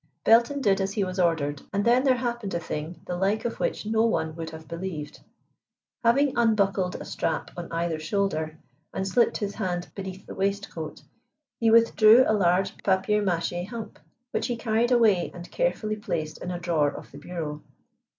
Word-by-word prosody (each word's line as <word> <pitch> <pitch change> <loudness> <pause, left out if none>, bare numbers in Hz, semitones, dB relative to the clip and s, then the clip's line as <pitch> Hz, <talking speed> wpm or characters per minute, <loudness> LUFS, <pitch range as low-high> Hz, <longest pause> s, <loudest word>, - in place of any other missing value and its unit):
Belton 235 +5 +4
did 195 -5 +3
as 195 +1 -1
he 205 - 0
was 185 0 -4
ordered 150 -5 +1
and 200 0 0
then 245 +2 +4
there 265 -2 +4
happened 240 -5 -3
a - - 0
thing 160 +1 -5
the 180 - -3
like 195 +5 0
of 235 - -3
which - - -1
no 220 +1 +1
one 160 -9 0
would 165 -1 -5
have 160 0 -11
believed. 170 -3 -6 0.8
Having 270 +4 +3
unbuckled 200 -5 +2
a - - -6
strap - - -2
on 175 -1 -7
either 165 -1 -1
shoulder, 160 -2 -1 0.4
and 190 0 -1
slipped 235 +5 +2
his 205 -1 -3
hand 180 -5 -3
beneath 190 -1 -7
the - - -8
waistcoat, 195 -5 -3 0.6
he 230 - +3
withdrew 230 +1 +7
a - - +2
large 190 -1 +2
papier 195 +2 +1
mâché 175 -1 -1
hump, 225 -1 -7 0.3
which - - -1
he 245 - -1
carried 230 +1 +1
away 220 -8 +4
and 175 0 -10
carefully 220 - -1
placed 155 -8 -4
in 180 - -5
a 180 - -3
drawer 165 -4 +1
of - - -10
the 140 - -10
bureau. 150 -2 -5
195 Hz, 180 wpm, -26 LUFS, 170-220 Hz, 0.8 s, withdrew